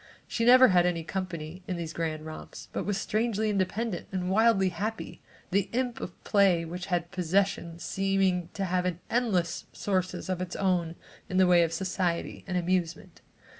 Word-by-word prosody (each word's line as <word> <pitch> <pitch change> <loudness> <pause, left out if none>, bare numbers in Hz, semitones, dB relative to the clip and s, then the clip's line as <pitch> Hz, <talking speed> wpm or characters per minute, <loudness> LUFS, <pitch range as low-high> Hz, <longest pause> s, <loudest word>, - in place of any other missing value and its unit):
She 230 - -1
never 255 +1 +8
had 180 -2 +4
any 170 -2 -1
company 170 -1 -5
in 185 - -2
these 165 -1 -5
grand 155 -2 -3
romps, 155 0 -9
but - - -3
was 205 -2 0
strangely 220 +1 0
independent 200 +1 -1
and 185 -1 -2
wildly 210 -2 +4
happy, 210 +6 -5 0.3
the 195 +1 +1
imp 250 -1 -1
of 175 - -8
play 190 -5 +3
which 180 +2 -6
had 175 -1 -1
possession, 180 -1 0
seeming 190 0 0
to 195 - -1
have 180 -1 0 0.2
endless 205 -9 0
sources 185 -2 -2
of 185 -1 -2
its 180 -1 -4
own 175 -4 0 0.3
in 185 - -1
the 190 - +6
way 175 -1 +6
of 165 -1 +1
society 180 0 -2
and 185 -1 -1
amusement. 175 -2 -2
185 Hz, 170 wpm, -28 LUFS, 170-195 Hz, 0.3 s, never